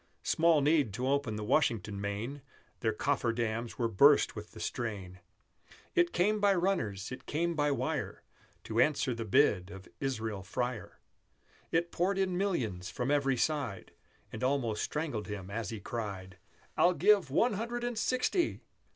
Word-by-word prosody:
Small 165 Hz, -2 st, +3 dB
need 145 Hz, -7 st, +3 dB
to 125 Hz, +3 st, -2 dB
open 140 Hz, -5 st, 0 dB
the 105 Hz, -, -4 dB
Washington 110 Hz, -5 st, +1 dB
main, 110 Hz, +8 st, -4 dB, 0.4 s
Their 110 Hz, -, +1 dB
coffer 125 Hz, +1 st, 0 dB
dams 115 Hz, 0 st, -3 dB
were 120 Hz, -, +1 dB
burst 140 Hz, +7 st, +5 dB
with 105 Hz, -1 st, -8 dB
the -, -, -10 dB
strain! 100 Hz, -7 st, -4 dB, 0.7 s
It 350 Hz, -1 st, +3 dB
came 210 Hz, +4 st, +2 dB
by 200 Hz, -1 st, +4 dB
runners, 115 Hz, -, -1 dB
it 130 Hz, -, -8 dB
came 170 Hz, +3 st, 0 dB
by 145 Hz, -2 st, +1 dB
wire, 140 Hz, -, -2 dB, 0.4 s
To -, -, -2 dB
answer 145 Hz, -3 st, +2 dB
the 115 Hz, -1 st, -4 dB
bid 105 Hz, -6 st, +3 dB
of 95 Hz, -1 st, -10 dB
Israel 110 Hz, -7 st, -2 dB
Freyer, 120 Hz, +4 st, -4 dB, 0.7 s
It 170 Hz, +1 st, +1 dB
poured 190 Hz, +3 st, 0 dB
in 190 Hz, -2 st, +1 dB
millions 125 Hz, -, -1 dB
from 125 Hz, +3 st, -2 dB
every 135 Hz, -3 st, +2 dB
side, 140 Hz, -8 st, -1 dB, 0.4 s
And -, -, -6 dB
almost 125 Hz, -5 st, 0 dB
strangled 145 Hz, -9 st, -3 dB
him 100 Hz, -2 st, -6 dB
as 110 Hz, 0 st, -3 dB
he 110 Hz, -, -5 dB
cried, 95 Hz, -4 st, -6 dB, 0.4 s
"I'll 180 Hz, +1 st, +4 dB
give 200 Hz, -8 st, +4 dB
One 220 Hz, -, +2 dB
Hundred 235 Hz, +4 st, -3 dB
and 240 Hz, 0 st, -2 dB
Sixty!" 255 Hz, -, 0 dB
130 Hz, 160 wpm, -31 LUFS, 105-165 Hz, 0.7 s, burst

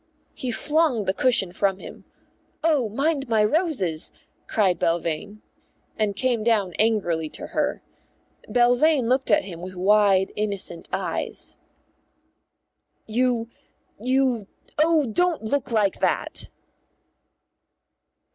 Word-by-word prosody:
He 255 Hz, -, -5 dB
flung 295 Hz, -3 st, +1 dB
the 190 Hz, -, +1 dB
cushion 195 Hz, -5 st, +2 dB
from 195 Hz, +1 st, 0 dB
him -, -, -11 dB, 0.6 s
("Oh, 295 Hz, -8 st, +2 dB
mind 275 Hz, +3 st, -1 dB
my 220 Hz, -2 st, +3 dB
roses," 210 Hz, -, 0 dB, 0.4 s
cried 190 Hz, -5 st, +1 dB
Belvane) 170 Hz, +5 st, -2 dB, 0.5 s
and 210 Hz, -2 st, -1 dB
came 240 Hz, 0 st, 0 dB
down 210 Hz, -6 st, +1 dB
angrily 175 Hz, -8 st, +1 dB
to -, -, -7 dB
her. -, -, -1 dB, 0.7 s
Belvane 245 Hz, +2 st, +3 dB
looked 260 Hz, +1 st, +1 dB
at 205 Hz, -, +4 dB
him 170 Hz, -3 st, -8 dB
with 185 Hz, +1 st, -8 dB
wide, 195 Hz, 0 st, +3 dB
innocent 200 Hz, -5 st, -2 dB
eyes. -, -, -3 dB, 1.5 s
"You 235 Hz, 0 st, 0 dB, 0.5 s
you 255 Hz, -3 st, +1 dB, 0.3 s
oh, 315 Hz, -1 st, +4 dB
don't 335 Hz, +6 st, 0 dB
look 275 Hz, +5 st, -1 dB
like 210 Hz, -4 st, +1 dB
that!" -, -, +1 dB
220 Hz, 110 wpm, -24 LUFS, 195-260 Hz, 1.5 s, at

